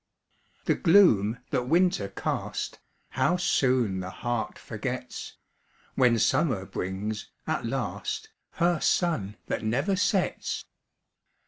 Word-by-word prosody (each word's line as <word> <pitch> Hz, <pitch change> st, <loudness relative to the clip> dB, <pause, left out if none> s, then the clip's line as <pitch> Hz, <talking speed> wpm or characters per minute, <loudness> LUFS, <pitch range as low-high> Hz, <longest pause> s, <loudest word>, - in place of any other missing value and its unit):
The -, -, +4 dB
gloom 125 Hz, -, +5 dB
that 125 Hz, 0 st, 0 dB
winter 170 Hz, -, +3 dB
cast, 100 Hz, -, -3 dB, 0.3 s
How 180 Hz, -, +2 dB
soon 125 Hz, -, +2 dB
the 95 Hz, 0 st, -4 dB
heart 120 Hz, +4 st, -3 dB
forgets, -, -, -5 dB, 0.6 s
When 125 Hz, -3 st, +4 dB
summer 110 Hz, -, +2 dB
brings, 95 Hz, +4 st, -4 dB, 0.2 s
at -, -, -1 dB
last, -, -, -3 dB, 0.2 s
Her 170 Hz, -1 st, +2 dB
sun 115 Hz, -, +1 dB
that -, -, -2 dB
never 135 Hz, -, +1 dB
sets! 190 Hz, 0 st, 0 dB
125 Hz, 105 wpm, -27 LUFS, 105-170 Hz, 0.6 s, gloom